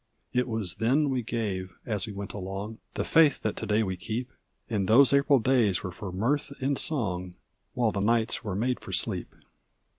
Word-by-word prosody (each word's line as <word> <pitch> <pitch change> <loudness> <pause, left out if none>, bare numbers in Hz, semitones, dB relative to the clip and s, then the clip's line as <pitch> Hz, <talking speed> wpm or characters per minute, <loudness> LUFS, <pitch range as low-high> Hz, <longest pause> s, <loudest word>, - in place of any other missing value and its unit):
It 125 0 +1
was 110 -6 -1
then 135 +6 +2
we 130 -1 0
gave, 100 -6 -3
as 110 -1 -2
we - - -5
went 100 0 -6
along, 100 +3 -5 0.2
The - - 0
faith 160 -4 +4
that 110 - -1
to - - -4
day 105 +1 +3
we 95 -3 -3
keep; 120 +7 -4 0.4
And 100 -4 -1
those 130 +6 +6
April 140 0 +5
days 115 -6 +2
were 95 - -4
for 90 +2 -7
mirth 140 +9 -1
and 140 +2 +1
song, 95 - -2 0.4
While 120 -3 +2
the 100 - -2
nights 115 +2 +1
were 100 -4 -3
made 125 +5 0
for - - -9
sleep. - - -1
110 Hz, 190 wpm, -28 LUFS, 100-130 Hz, 0.4 s, those